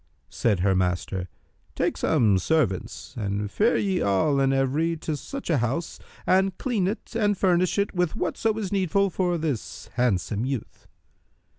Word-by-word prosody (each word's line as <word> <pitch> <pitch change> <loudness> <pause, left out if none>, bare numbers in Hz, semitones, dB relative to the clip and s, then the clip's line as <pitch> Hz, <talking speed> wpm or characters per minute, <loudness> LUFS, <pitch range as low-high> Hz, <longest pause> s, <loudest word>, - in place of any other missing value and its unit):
Said 105 -6 +1
her 95 0 +3
master, 90 0 -1 0.5
"Take - - 0
some 105 -5 +3
servants 120 - -1
and 100 -1 -2
fare 220 - +3
ye 190 -3 0
all 120 +9 +2
and 135 0 +3
every 145 +5 +1
to 155 -1 -3
such 275 - -7
a 150 - +3
house 130 +8 -2 0.3
and 190 0 +2
clean 225 -8 0
it 215 +5 -4
and 205 -3 +2
furnish 180 0 +2
it 200 0 0
with 180 -3 0
whatso 225 0 0
is 205 -4 -3
needful 195 0 +1
for 175 -1 0
this 155 -8 -4
handsome 110 -3 0
youth." 130 -3 -5
155 Hz, 155 wpm, -25 LUFS, -, 0.5 s, her